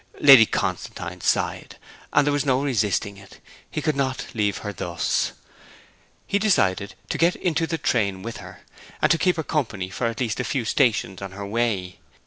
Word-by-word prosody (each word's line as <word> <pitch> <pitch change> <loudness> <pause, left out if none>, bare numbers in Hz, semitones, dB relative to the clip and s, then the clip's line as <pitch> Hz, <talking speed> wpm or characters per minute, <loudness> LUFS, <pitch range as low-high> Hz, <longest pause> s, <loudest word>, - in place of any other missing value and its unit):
Lady 135 -6 +9
Constantine - - -3
sighed; - - -1 0.3
and 145 - +4
there 145 - +2
was 145 - +1
no 135 -1 +1
resisting 105 -6 0
it, 100 0 -15 0.3
he - - -4
could 155 - +1
not 130 -1 -1
leave 105 -4 0
her 105 - -3
thus. 85 -3 -1 0.9
He 200 - 0
decided 100 - +1
to - - -2
get 170 +2 +3
into 165 -2 0
the 165 - -2
train 105 -10 0
with 115 +1 -6
her, - - -11 0.4
and 165 - +3
keep 180 +2 +2
her 160 - -2
company 110 - -2
for 115 +6 -1
at 115 0 -4
least 120 -3 -1
a - - 0
few 120 0 -2
stations 110 -6 +1
on 95 -1 -6
her 100 +1 -6
way. 100 -4 -2
115 Hz, 180 wpm, -23 LUFS, 100-145 Hz, 0.9 s, Lady